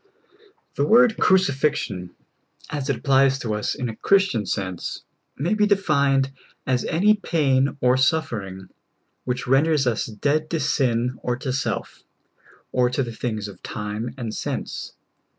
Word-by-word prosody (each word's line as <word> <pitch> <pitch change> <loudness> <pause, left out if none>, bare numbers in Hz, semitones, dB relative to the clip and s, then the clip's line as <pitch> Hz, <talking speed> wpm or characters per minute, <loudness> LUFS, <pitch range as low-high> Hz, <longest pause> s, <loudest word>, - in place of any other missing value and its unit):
THE 140 - +2
word 235 +2 +6
crucifixion, 140 - +1 0.6
as 140 -2 -3
it 140 - +2
applies 135 +2 +3
to 115 -5 -3
us 105 0 -2
in 125 - -3
a 110 - -5
Chris 195 - +3
tian 110 -6 -2
sense, 95 -3 -4 0.4
ma}^ 170 +9 +1
be 210 -1 +3
defined 140 -9 +2 0.3
as 125 -2 +1
any 200 +6 +3
pain 140 -8 +1
or 125 +1 +4
suffer 130 -4 +1
ing 95 -1 -10 0.6
which 125 0 -2
renders 140 +2 +3
us 120 -3 0
dead 145 +8 -1
to 165 - -1
sin 125 -4 0
or 125 - -1
to 130 -1 -3
self, 135 0 -3 0.7
or 125 -1 +2
to 130 +2 0
the 120 -2 -6
things 110 -3 -3
of 95 -3 -12
time 105 +3 -5
and 115 -4 -4
sense. - - -4
130 Hz, 150 wpm, -23 LUFS, 115-150 Hz, 0.7 s, word